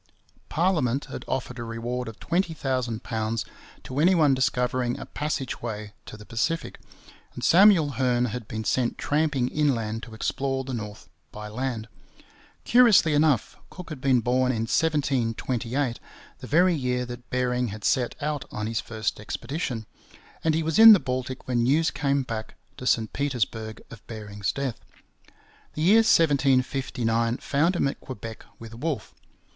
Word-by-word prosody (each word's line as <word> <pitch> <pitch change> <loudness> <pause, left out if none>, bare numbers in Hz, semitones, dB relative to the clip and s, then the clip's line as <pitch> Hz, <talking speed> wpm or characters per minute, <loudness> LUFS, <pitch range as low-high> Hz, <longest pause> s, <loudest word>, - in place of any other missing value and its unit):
Parliament 150 -7 +1
had - - -6
offered 125 -1 -3
a - - -4
reward 120 +2 -4
of 110 -2 -9
£20,000 125 - -2 0.4
to 130 +2 -4
any 180 +5 +5
one 150 -5 +4
discovering 125 -1 0
a - - -7
passage 145 -4 -3
way 105 -2 -5
to 110 - -9
the 105 - -13
Pacific, 150 - -2 0.6
and - - -7
Samuel 180 -5 +6
Hearne 125 -2 +2
had 115 -1 -6
been 110 0 -4
sent 120 +3 0
tramping 145 -4 0
inland 115 -7 0
to 115 -2 -10
explore 135 +4 -2
the 130 0 -6
north 105 -3 -6 0.2
by 105 0 -8
land. 115 -1 -3 0.8
Curiously 230 -10 +5
enough, 145 -4 +2
Cook 180 -2 -10
had 150 -5 -7
been 130 -3 +3
born 125 +2 +2
in 115 -3 -1
1728, 125 -3 0 0.4
the - - -9
very 175 +4 +4
year 125 -4 -1
that 120 0 -9
Bering 125 -1 0
had 105 0 -7
set 125 -2 +1
out 150 -2 -2
on 105 - -4
his 110 0 -1
first 110 -3 -3
expedition; 125 +1 -4 0.6
and 160 -1 +2
he 165 - 0
was 160 +3 0
in 225 0 +12
the 200 - +5
Baltic 130 -1 -4
when 120 -2 +1
news 150 +7 +3
came 140 -1 0
back 110 -3 -6 0.2
to 125 - -5
St 110 -3 +1
Petersburg 115 -5 -2
of 115 - -13
Bering's 105 -2 -4
death. 135 -2 -3 1.0
The 155 - -2
year 200 +6 +6
1759 130 - +2
found 165 +6 +1
him 155 - +2
at 140 - -5
Quebec 115 -3 -8
with 115 -1 -11
Wolfe. 130 -1 -4
125 Hz, 155 wpm, -26 LUFS, 115-145 Hz, 1.0 s, in